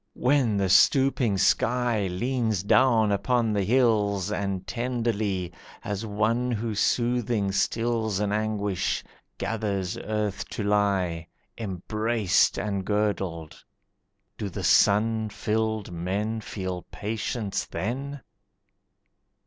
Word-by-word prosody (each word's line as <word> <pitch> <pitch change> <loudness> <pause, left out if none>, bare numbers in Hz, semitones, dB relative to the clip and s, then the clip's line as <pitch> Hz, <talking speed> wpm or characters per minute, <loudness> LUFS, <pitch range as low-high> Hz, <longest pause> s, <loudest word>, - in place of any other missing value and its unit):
When 125 -5 +2
the 100 -1 +1
stooping 125 +3 +4
sky 115 +1 +2
Leans 110 +1 -1
down 110 -1 +4
upon 115 +2 +1
the 100 - +1
hills 105 -4 +2
And 100 -3 -2
tenderly, 110 -7 -2 0.3
as 105 +1 -3
one 110 +4 0
who 115 -1 -2
soothing 120 -1 +1
stills 110 +1 0
An 105 -1 0
anguish, 105 -2 -1 0.3
gathers 100 -5 -2
earth 105 -2 -3
to 105 - -4
lie 95 -5 +1 0.3
Embraced 105 0 +1
and 100 -1 -2
girdled. 95 -6 -2 0.8
Do 100 - -3
the - - -6
sun 110 +1 +3
filled 110 -1 -2
men 100 +6 -2
Feel 95 -4 -5
patience 110 -1 -3
then? 135 +6 -4
105 Hz, 100 wpm, -26 LUFS, 100-115 Hz, 0.8 s, stooping